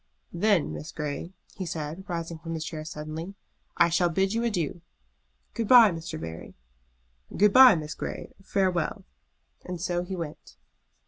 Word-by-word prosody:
"Then, 190 Hz, -2 st, +2 dB
Miss 155 Hz, -, -7 dB
Grey," 150 Hz, +2 st, -5 dB, 0.3 s
he 190 Hz, -, -4 dB
said, 160 Hz, +3 st, -5 dB
rising 170 Hz, -2 st, -4 dB
from 165 Hz, 0 st, -5 dB
his 160 Hz, 0 st, -4 dB
chair 155 Hz, -3 st, -5 dB
suddenly, 155 Hz, +4 st, -7 dB, 0.4 s
"I 170 Hz, -, +5 dB
shall 175 Hz, +1 st, +2 dB
bid 190 Hz, +4 st, +1 dB
you 230 Hz, +1 st, 0 dB
adieu." 175 Hz, -8 st, -2 dB, 0.7 s
"Good 230 Hz, -, -2 dB
bye, 235 Hz, -4 st, +8 dB
Mr. 165 Hz, -, -6 dB
Barry." 80 Hz, 0 st, -8 dB, 0.8 s
"Good 205 Hz, 0 st, +5 dB
bye, 255 Hz, -5 st, +9 dB
Miss 155 Hz, -1 st, -4 dB
Grey. -, -, -6 dB
Farewell!" 185 Hz, -3 st, 0 dB, 0.6 s
And 180 Hz, -1 st, -6 dB
so 175 Hz, 0 st, -1 dB
he 185 Hz, +2 st, -5 dB
went. 165 Hz, -4 st, -8 dB
170 Hz, 150 wpm, -27 LUFS, 160-195 Hz, 0.8 s, bye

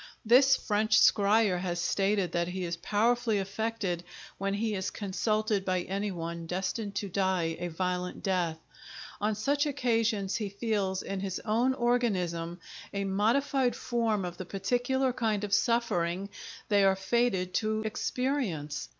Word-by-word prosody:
This 260 Hz, +4 st, +6 dB
French 215 Hz, -1 st, +2 dB
scryer 205 Hz, -2 st, +4 dB
has 175 Hz, -1 st, -2 dB
stated 195 Hz, 0 st, +1 dB
that 170 Hz, 0 st, 0 dB
he 185 Hz, +1 st, -4 dB
is 170 Hz, 0 st, -2 dB
powerfully 225 Hz, +4 st, +1 dB
affected 195 Hz, -2 st, -2 dB, 0.4 s
when 195 Hz, 0 st, -1 dB
he 220 Hz, +1 st, -1 dB
is 190 Hz, -1 st, -2 dB
consulted 215 Hz, 0 st, -1 dB
by 185 Hz, -1 st, 0 dB
any 200 Hz, +3 st, -2 dB
one 170 Hz, -2 st, -5 dB
destined 195 Hz, +4 st, -3 dB
to 205 Hz, -, -2 dB
die 185 Hz, -3 st, 0 dB
a 175 Hz, -, -2 dB
violent 180 Hz, +1 st, -3 dB
death; 180 Hz, -4 st, 0 dB, 0.6 s
on 210 Hz, +1 st, 0 dB
such 285 Hz, +8 st, +1 dB
occasions 230 Hz, -7 st, 0 dB
he 210 Hz, -3 st, -3 dB
feels, 200 Hz, -2 st, -1 dB
in 195 Hz, 0 st, -4 dB
his 190 Hz, -1 st, -3 dB
own 235 Hz, +4 st, +2 dB
organism, 185 Hz, -9 st, 0 dB, 0.3 s
a 200 Hz, 0 st, -2 dB
modified 245 Hz, +6 st, +1 dB
form 225 Hz, -5 st, 0 dB
of 175 Hz, 0 st, -6 dB
the 185 Hz, -, -6 dB
particular 245 Hz, +7 st, 0 dB
kind 215 Hz, -4 st, 0 dB
of 205 Hz, -1 st, -3 dB
suffering 200 Hz, -6 st, +1 dB, 0.4 s
they 205 Hz, -2 st, +4 dB
are 195 Hz, -1 st, +5 dB
fated 190 Hz, -2 st, 0 dB
to 215 Hz, +1 st, 0 dB
experience. 220 Hz, -, -2 dB
200 Hz, 145 wpm, -29 LUFS, 185-230 Hz, 0.6 s, This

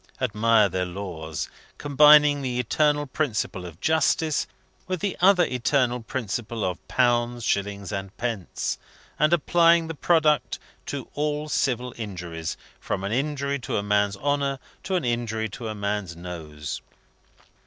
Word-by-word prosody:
Admire 115 Hz, -2 st, +3 dB
their 95 Hz, -1 st, -1 dB
laws, 85 Hz, -4 st, -5 dB, 0.3 s
combining 150 Hz, 0 st, +6 dB
the 125 Hz, -2 st, -2 dB
eternal 145 Hz, +4 st, +2 dB
principle 115 Hz, -, -2 dB
of 85 Hz, -1 st, -12 dB
justice 160 Hz, -1 st, +2 dB, 0.4 s
with 185 Hz, -1 st, -2 dB
the 200 Hz, +1 st, -1 dB
other 185 Hz, -1 st, +6 dB
eternal 125 Hz, -1 st, +1 dB
principle 115 Hz, -2 st, -3 dB
of 90 Hz, -2 st, -4 dB
pounds, 120 Hz, -1 st, +1 dB
shillings, 100 Hz, -2 st, -1 dB
and 100 Hz, -1 st, -5 dB
pence; 115 Hz, -6 st, -3 dB, 0.4 s
and 150 Hz, +2 st, +4 dB
applying 170 Hz, 0 st, +4 dB
the 165 Hz, -, -4 dB
product 155 Hz, -1 st, +2 dB, 0.3 s
to 140 Hz, -3 st, -4 dB
all 150 Hz, +1 st, -1 dB
civil 125 Hz, -4 st, 0 dB
injuries, 85 Hz, -7 st, -5 dB, 0.2 s
from 95 Hz, -, -3 dB
an 100 Hz, -, -2 dB
injury 140 Hz, +2 st, -1 dB
to 125 Hz, -, -3 dB
a 100 Hz, -, -1 dB
man's 105 Hz, -1 st, +1 dB
honour, 140 Hz, +1 st, 0 dB, 0.2 s
to 190 Hz, -, -2 dB
an 175 Hz, -7 st, 0 dB
injury 115 Hz, -2 st, -1 dB
to 115 Hz, +3 st, -7 dB
a 110 Hz, -, -4 dB
man's 100 Hz, -3 st, -2 dB
nose! 80 Hz, -4 st, -6 dB
120 Hz, 140 wpm, -25 LUFS, 100-145 Hz, 0.4 s, combining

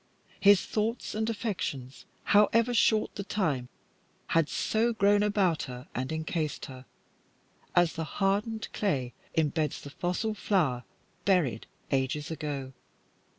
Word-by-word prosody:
His 200 Hz, -2 st, +6 dB
thoughts 225 Hz, +3 st, -2 dB
and 220 Hz, +1 st, -1 dB
affections, 175 Hz, -, -4 dB, 0.2 s
however 230 Hz, +4 st, +4 dB
short 220 Hz, -2 st, +3 dB
the 200 Hz, -, -5 dB
time, 155 Hz, -12 st, -1 dB, 0.6 s
had 165 Hz, -2 st, +3 dB
so 230 Hz, +2 st, +1 dB
grown 205 Hz, -1 st, +4 dB
about 200 Hz, -6 st, +2 dB
her 125 Hz, -1 st, -8 dB
and 130 Hz, +3 st, -3 dB
encased 160 Hz, -1 st, -2 dB
her, 130 Hz, -1 st, -10 dB, 0.9 s
as 175 Hz, -2 st, +4 dB
the 165 Hz, -, -3 dB
hardened 210 Hz, +3 st, 0 dB
clay 135 Hz, -12 st, -1 dB, 0.2 s
imbeds 155 Hz, -1 st, +1 dB
the 140 Hz, -, -10 dB
fossil 180 Hz, +8 st, -1 dB
flower 155 Hz, -, 0 dB, 0.4 s
buried 160 Hz, -, +2 dB, 0.2 s
ages 140 Hz, +3 st, 0 dB
ago. 140 Hz, -4 st, -4 dB
175 Hz, 120 wpm, -29 LUFS, 140-210 Hz, 0.9 s, His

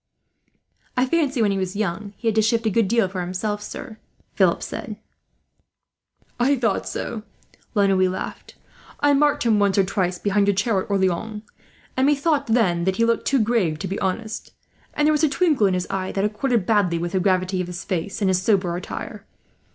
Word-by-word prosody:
"I 250 Hz, -, +4 dB
fancy, 275 Hz, -4 st, +1 dB
when 205 Hz, -, +2 dB
he 195 Hz, -, -1 dB
was 185 Hz, +1 st, -3 dB
young, 200 Hz, 0 st, -3 dB
he 235 Hz, -, -4 dB
had 225 Hz, -, +3 dB
to 220 Hz, -, +3 dB
shift 225 Hz, +1 st, +1 dB
a 220 Hz, -, +2 dB
good 225 Hz, 0 st, +2 dB
deal 230 Hz, -1 st, +2 dB
for 185 Hz, 0 st, -4 dB
himself, 195 Hz, +4 st, -3 dB
sir," 225 Hz, +1 st, -8 dB, 0.3 s
Philip -, -, +2 dB
replied. -, -, -6 dB, 1.4 s
"I 270 Hz, +4 st, +3 dB
thought 225 Hz, -6 st, -1 dB
so," 225 Hz, -2 st, -4 dB, 0.5 s
La 205 Hz, -1 st, +4 dB
Noue 185 Hz, -1 st, +3 dB
laughed. 185 Hz, +1 st, -6 dB, 0.5 s
"I 290 Hz, 0 st, +4 dB
marked 290 Hz, +1 st, +3 dB
him 225 Hz, -3 st, +3 dB
once 200 Hz, -1 st, +2 dB
or 195 Hz, -, +5 dB
twice, 185 Hz, -2 st, -1 dB
behind 200 Hz, +1 st, +1 dB
your 200 Hz, -, +3 dB
chair 205 Hz, 0 st, +1 dB
at -, -, -9 dB
Orleans; 200 Hz, +2 st, -1 dB, 0.5 s
and 260 Hz, +1 st, +2 dB
methought, 290 Hz, 0 st, +1 dB
then, 190 Hz, -7 st, +2 dB
that 190 Hz, 0 st, +1 dB
he 230 Hz, -, +2 dB
looked 230 Hz, 0 st, 0 dB
too 275 Hz, -, +3 dB
grave 210 Hz, -9 st, +1 dB
to 190 Hz, -, -4 dB
be 195 Hz, -, -3 dB
honest; 215 Hz, +4 st, -3 dB, 0.4 s
and 295 Hz, -, +2 dB
there 310 Hz, -, +4 dB
was 300 Hz, +1 st, +1 dB
a 310 Hz, -, +4 dB
twinkle 290 Hz, -, +2 dB
in 185 Hz, -, +1 dB
his 180 Hz, 0 st, -1 dB
eye, 190 Hz, -1 st, -2 dB
that 195 Hz, +1 st, 0 dB
accorded 220 Hz, 0 st, 0 dB
badly 200 Hz, -6 st, +2 dB
with 170 Hz, +1 st, -3 dB
the 190 Hz, -, +1 dB
gravity 185 Hz, 0 st, +1 dB
of 180 Hz, -, -4 dB
his 180 Hz, 0 st, -6 dB
face, 190 Hz, +3 st, -3 dB
and -, -, +3 dB
his 185 Hz, -1 st, +1 dB
sober 185 Hz, -4 st, +1 dB
attire. 180 Hz, -, -7 dB
205 Hz, 205 wpm, -23 LUFS, 185-230 Hz, 1.4 s, or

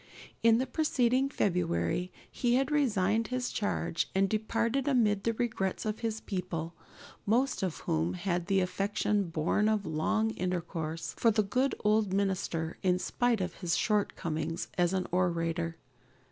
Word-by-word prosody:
In 230 Hz, 0 st, +6 dB
the 255 Hz, -, 0 dB
preceding 260 Hz, -2 st, +1 dB
February 180 Hz, -, 0 dB, 0.2 s
he 240 Hz, -1 st, +1 dB
had 270 Hz, +3 st, +1 dB
resigned 225 Hz, -6 st, +2 dB
his 255 Hz, 0 st, -2 dB
charge 205 Hz, -5 st, -1 dB
and 195 Hz, 0 st, +4 dB
departed 230 Hz, +5 st, 0 dB
amid 215 Hz, -7 st, +2 dB
the 230 Hz, -, +2 dB
regrets 220 Hz, -4 st, -2 dB
of 215 Hz, 0 st, -2 dB
his 220 Hz, -1 st, -2 dB
people, 170 Hz, -4 st, -4 dB, 0.5 s
most 250 Hz, +6 st, +2 dB
of 185 Hz, -5 st, -2 dB
whom 80 Hz, +3 st, 0 dB
had 175 Hz, -, -2 dB
the 195 Hz, -1 st, +3 dB
affection 200 Hz, +2 st, 0 dB
born 165 Hz, +7 st, +1 dB
of 215 Hz, -2 st, 0 dB
long 215 Hz, +8 st, 0 dB
intercourse 165 Hz, -4 st, -3 dB
for 230 Hz, -, +5 dB
their 215 Hz, -1 st, +2 dB
good 255 Hz, +7 st, +1 dB
old 210 Hz, -2 st, +3 dB
minister 185 Hz, -4 st, -1 dB
in 180 Hz, -1 st, +2 dB
spite 235 Hz, +3 st, 0 dB
of 180 Hz, -2 st, -2 dB
his 175 Hz, -3 st, 0 dB
shortcomings 170 Hz, -6 st, -1 dB
as 175 Hz, -1 st, +2 dB
an 185 Hz, -1 st, 0 dB
orator. 170 Hz, -2 st, 0 dB
200 Hz, 145 wpm, -30 LUFS, 175-230 Hz, 0.5 s, In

